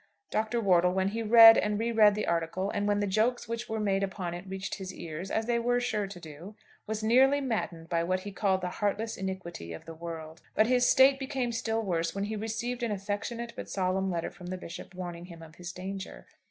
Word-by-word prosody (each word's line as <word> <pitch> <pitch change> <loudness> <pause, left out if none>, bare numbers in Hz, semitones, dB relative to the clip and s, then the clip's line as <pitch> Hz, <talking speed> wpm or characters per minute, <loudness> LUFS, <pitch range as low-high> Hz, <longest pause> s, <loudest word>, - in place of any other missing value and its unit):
Dr. 220 +2 0
Wortle, 180 -4 +3
when 190 +1 +1
he 225 +3 -3
read 225 0 +9
and 210 0 0
re 230 +2 -1
read 210 -2 +5
the 210 - -1
article, 170 +4 -1
and 205 0 -1
when 205 0 +2
the - - +1
jokes 220 +5 +1
which 230 +1 -4
were 220 0 -2
made 195 -2 +1
upon 190 -3 -3
it 175 +2 -7
reached 190 +1 -5
his 190 -1 -5
ears, 170 +1 -7
as 220 - -1
they 235 0 +1
were 245 +1 +1
sure 215 -4 -1
to 195 -2 -9
do, 165 +5 -10 0.3
was 220 0 -3
nearly 265 +5 +5
maddened 215 -11 -3
by 170 0 0
what 185 +2 0
he 205 - -7
called 195 -1 +1
the 180 - -2
heartless 210 +2 0
iniquity 185 - -5
of 80 - -10
the 165 - -8
world; 160 -1 -8
but 215 - +5
his 245 +1 +3
state 270 +1 +6
became 265 -3 -2
still 225 -1 -1
worse 165 -3 -1
when 200 - -1
he 215 +2 -3
received 225 +3 -3
an 235 - 0
affectionate 205 +4 -4
but - - -7
solemn 190 0 0
letter 170 -2 -2
from 180 -2 -11
the 185 +1 -4
Bishop 180 +1 -9
warning 175 -1 -6
him 170 -2 -11
of 160 0 -14
his 175 -1 -6
danger. 190 +2 -7
200 Hz, 230 wpm, -29 LUFS, 180-225 Hz, 0.3 s, read